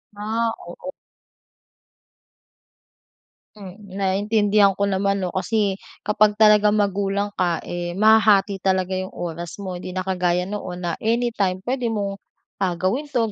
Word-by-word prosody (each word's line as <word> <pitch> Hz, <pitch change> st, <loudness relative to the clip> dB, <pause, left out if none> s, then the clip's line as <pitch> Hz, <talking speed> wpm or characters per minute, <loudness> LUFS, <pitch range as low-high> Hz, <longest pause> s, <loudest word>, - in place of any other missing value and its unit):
Ah, 225 Hz, +2 st, -1 dB, 0.2 s
oo. 225 Hz, +10 st, -8 dB, 2.6 s
Hmm, 195 Hz, -1 st, -11 dB
naiintindihan 200 Hz, +1 st, +2 dB
ko 200 Hz, -, -1 dB
naman 195 Hz, 0 st, 0 dB
'no. 180 Hz, -, -2 dB
Kasi 195 Hz, +1 st, 0 dB, 0.2 s
kapag 210 Hz, 0 st, +3 dB
talagang 210 Hz, -1 st, +5 dB
magulang 200 Hz, 0 st, 0 dB
ka, 175 Hz, -2 st, 0 dB
eh, 175 Hz, 0 st, -4 dB
mahahati 210 Hz, -2 st, +4 dB
talaga 190 Hz, -1 st, 0 dB
yung 185 Hz, 0 st, -5 dB
oras 170 Hz, -1 st, -5 dB
mo. 185 Hz, -2 st, -5 dB
'Di 185 Hz, +1 st, -7 dB
na 185 Hz, -, -1 dB
kagaya 180 Hz, -1 st, 0 dB
noon 180 Hz, -2 st, -6 dB
na 170 Hz, -1 st, -2 dB
anytime 220 Hz, -5 st, 0 dB
puwede 250 Hz, 0 st, -1 dB
mong, 200 Hz, -3 st, -2 dB, 0.4 s
ah, 185 Hz, -3 st, 0 dB
gawin 195 Hz, -, -1 dB
'to, 235 Hz, -6 st, 0 dB
200 Hz, 130 wpm, -22 LUFS, 185-215 Hz, 2.6 s, talagang